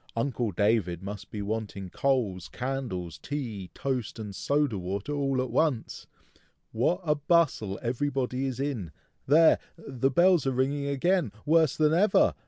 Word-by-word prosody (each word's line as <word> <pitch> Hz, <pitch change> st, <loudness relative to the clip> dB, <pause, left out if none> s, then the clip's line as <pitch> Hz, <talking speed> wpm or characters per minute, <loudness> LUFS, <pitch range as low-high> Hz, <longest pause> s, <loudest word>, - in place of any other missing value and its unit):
Uncle 120 Hz, -1 st, -1 dB
David 95 Hz, -3 st, +1 dB
must 100 Hz, 0 st, -7 dB
be 105 Hz, -1 st, -5 dB
wanting 105 Hz, -2 st, -4 dB
coals, 115 Hz, -10 st, 0 dB
candles, 115 Hz, -, -4 dB
tea, 110 Hz, -, -5 dB
toast, 130 Hz, -5 st, -3 dB
and 105 Hz, -3 st, -6 dB
soda 140 Hz, -6 st, 0 dB
water, 95 Hz, +8 st, -4 dB
all 135 Hz, -2 st, 0 dB
at 130 Hz, -, -6 dB
once! 145 Hz, -8 st, 0 dB, 0.6 s
What 170 Hz, +11 st, +1 dB
a 150 Hz, -3 st, +2 dB
bustle 145 Hz, -, +1 dB
everybody 130 Hz, +1 st, -1 dB
is 130 Hz, -1 st, -4 dB
in! 120 Hz, -, -3 dB, 0.3 s
There! 160 Hz, +4 st, +6 dB, 0.2 s
the 135 Hz, -5 st, -1 dB
bells 175 Hz, 0 st, +4 dB
are 135 Hz, -, +1 dB
ringing 140 Hz, +3 st, 0 dB
again, 145 Hz, -, +1 dB
worse 160 Hz, -2 st, +3 dB
than 155 Hz, 0 st, +3 dB
ever! 200 Hz, +6 st, +4 dB
130 Hz, 145 wpm, -28 LUFS, 105-145 Hz, 0.6 s, There